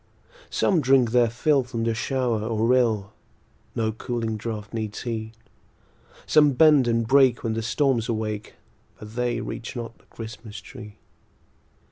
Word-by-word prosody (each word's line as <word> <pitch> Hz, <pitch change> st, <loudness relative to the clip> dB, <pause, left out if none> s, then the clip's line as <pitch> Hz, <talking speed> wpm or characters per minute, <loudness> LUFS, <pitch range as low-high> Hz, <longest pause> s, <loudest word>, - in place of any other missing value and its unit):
Some 180 Hz, -5 st, +2 dB
drink 130 Hz, -3 st, +4 dB
their 120 Hz, -1 st, +4 dB
fill 135 Hz, +5 st, +2 dB
from 120 Hz, -2 st, -4 dB
the 115 Hz, 0 st, +1 dB
shower 120 Hz, 0 st, -1 dB
or 110 Hz, 0 st, 0 dB
rill; 115 Hz, -5 st, +2 dB, 0.6 s
No 110 Hz, -1 st, 0 dB
cooling 115 Hz, 0 st, -3 dB
draught 105 Hz, -1 st, -6 dB
needs 110 Hz, -2 st, -4 dB
he; 110 Hz, -2 st, -4 dB, 0.9 s
Some 150 Hz, -2 st, +5 dB
bend 145 Hz, -2 st, +5 dB
and 115 Hz, -1 st, +1 dB
break 135 Hz, +1 st, +4 dB
when 115 Hz, -, -1 dB
the 115 Hz, -, -2 dB
storms 120 Hz, 0 st, 0 dB
awake, 110 Hz, -2 st, -3 dB, 0.4 s
But 105 Hz, +1 st, -11 dB
they 125 Hz, 0 st, -1 dB
reach 115 Hz, -, -6 dB
not 115 Hz, -1 st, -7 dB
the -, -, -27 dB
Christmas 110 Hz, -2 st, -9 dB
tree. 105 Hz, 0 st, -11 dB
115 Hz, 145 wpm, -24 LUFS, 110-125 Hz, 0.9 s, Some